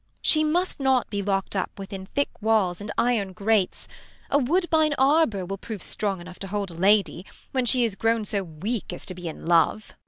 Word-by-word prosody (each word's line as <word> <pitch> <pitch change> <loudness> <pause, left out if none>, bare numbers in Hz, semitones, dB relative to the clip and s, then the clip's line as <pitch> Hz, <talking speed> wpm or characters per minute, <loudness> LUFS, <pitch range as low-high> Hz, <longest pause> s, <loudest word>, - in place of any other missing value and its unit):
She 310 0 +4
must 345 +4 0
not 265 -2 +2
be 205 -1 -1
lockt 195 0 -1
up 190 +1 -2
within 195 -1 -7
thick 285 +6 -1
walls 205 -5 +2
And 205 0 -5
iron 220 -6 +1
grates: 205 -1 0 0.4
a 285 - +4
wood1)ine 315 +1 +2
arbour 265 - +3
will 195 +2 -5
Prove 215 -3 -6
strong 200 -3 -2
enough 180 +1 -11
to 195 - -6
hold 200 -1 -3
a - - -10
lady, 190 0 +2 0.3
when 255 -2 0
She 245 +1 +3
is 225 -4 0
grown 225 +2 +1
so 200 0 -1
weak 190 +7 -4
as - - -8
to 185 - -5
be 180 -1 -7
in 160 - -7
love. 170 +5 +2
205 Hz, 205 wpm, -25 LUFS, 190-250 Hz, 0.4 s, She